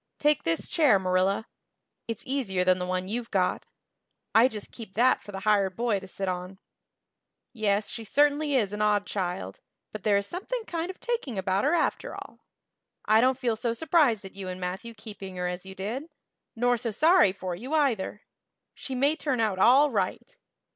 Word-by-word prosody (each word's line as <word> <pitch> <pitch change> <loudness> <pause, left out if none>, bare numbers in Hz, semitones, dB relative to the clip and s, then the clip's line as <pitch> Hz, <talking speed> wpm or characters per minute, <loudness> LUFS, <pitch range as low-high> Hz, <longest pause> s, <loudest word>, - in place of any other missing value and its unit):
Take 295 0 +2
this 165 0 -1
chair, 295 - +4
Marilla; 190 +3 +1 0.6
it's 230 -2 -4
easier 230 -9 0
than 185 0 +3
the 180 - -3
one 185 0 -2
you've 235 +3 -3
got; 185 -3 0 0.7
I 230 +3 +7
just 215 -5 -7
keep 220 -5 -10
that 250 +4 +4
for 205 - -11
the 195 -1 -6
hired 200 -2 +2
boy 230 -4 0
to 190 - -11
sit 195 +1 -5
on. 180 +1 -4 1.0
Yes, 210 -2 0
she 230 - -5
certainly 290 +4 +2
is 210 -6 +1
an 210 - -3
odd 210 -1 +2
child, 175 - -4 0.3
but 215 - -7
there 205 +1 +3
is 200 - -1
something 420 - -4
kind 340 -2 -3
of 375 - -8
taking 460 - -3
about 190 +3 0
her 300 +4 +3
after - - -1
all. - - -10 0.7
I 215 +1 +5
don't 255 +1 +3
feel 245 -4 0
so 230 +1 -1
surprised 275 - +2
at 190 - -10
you 195 -1 -7
and 185 0 -5
Matthew 190 +6 -5
keeping 205 -3 -9
her 180 0 -2
as 180 +1 -5
I 190 - -8
did 230 - -5 0.5
nor 245 +1 +2
so 230 +1 -3
sorry 310 - +5
for 185 -1 -5
you, 250 - -4
either. 230 -9 0 0.5
She 265 - -6
may 280 +4 +2
turn 275 -6 -1
out 210 -4 0
all 275 +8 +6
right. 210 - -2
215 Hz, 190 wpm, -27 LUFS, 190-260 Hz, 1.0 s, I